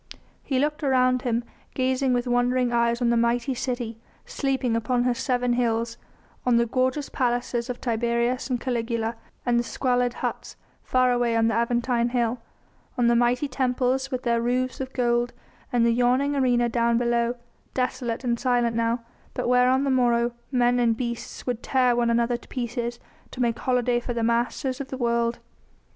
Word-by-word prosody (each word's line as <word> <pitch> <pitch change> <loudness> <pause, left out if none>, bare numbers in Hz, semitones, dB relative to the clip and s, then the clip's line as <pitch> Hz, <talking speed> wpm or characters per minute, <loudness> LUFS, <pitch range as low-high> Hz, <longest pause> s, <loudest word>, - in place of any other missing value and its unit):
He 265 - -2
looked 300 +3 0
around 255 -2 +3
him, 240 -1 -1 0.3
gazing 260 0 +1
with 245 0 +1
wondering 245 0 +1
eyes 235 +1 +1
on 235 - +3
the - - +3
mighty 235 +3 +1
city 240 -3 -4 0.3
sleeping 265 -4 -1
upon 240 +2 +1
her 250 0 +2
seven 245 0 0
hills, 230 -1 0 0.4
on 250 -1 +3
the 235 - +3
gorgeous 260 +4 0
palaces 245 -1 -1
of 245 - -4
Tiberius 235 +2 0
and 250 -2 0
Caligula 230 -2 -2 0.3
and 240 -1 +3
the - - 0
squalid 245 0 0
huts - - -4 0.3
far 255 -1 +2
away 240 -1 +1
on 225 0 +3
the - - 0
Aventine 235 0 +1
Hill, 240 -1 0 0.6
on 245 - +2
the 235 - +4
mighty 245 +4 +2
temples 260 0 0
with 255 -1 -3
their 235 -1 +1
roofs 255 +2 -1
of 260 0 -5
gold 240 -1 0 0.4
and 240 -2 +3
the 235 - +4
yawning 250 +4 +2
arena 245 -3 +2
down 235 0 +1
below, 235 0 +1 0.4
desolate 250 -2 -2
and 235 -2 0
silent 240 -2 +1
now, 230 +1 0 0.3
but - - -2
where 250 0 +4
on 260 +1 +3
the 275 - +1
morrow 240 -2 +2 0.2
men 245 -1 +3
and 230 -2 +2
beasts 235 -1 -5
would 245 -2 -2
tear 255 -2 +2
one 240 -1 +1
another 235 +1 +1
to - - -19
pieces 240 -1 -3 0.3
to - - -11
make 235 -2 0
holiday 250 -1 +1
for 240 0 -5
the 230 - -1
masters 245 +3 0
of 275 - -6
the 265 - -6
world. 235 -1 0
245 Hz, 180 wpm, -25 LUFS, 235-255 Hz, 0.6 s, the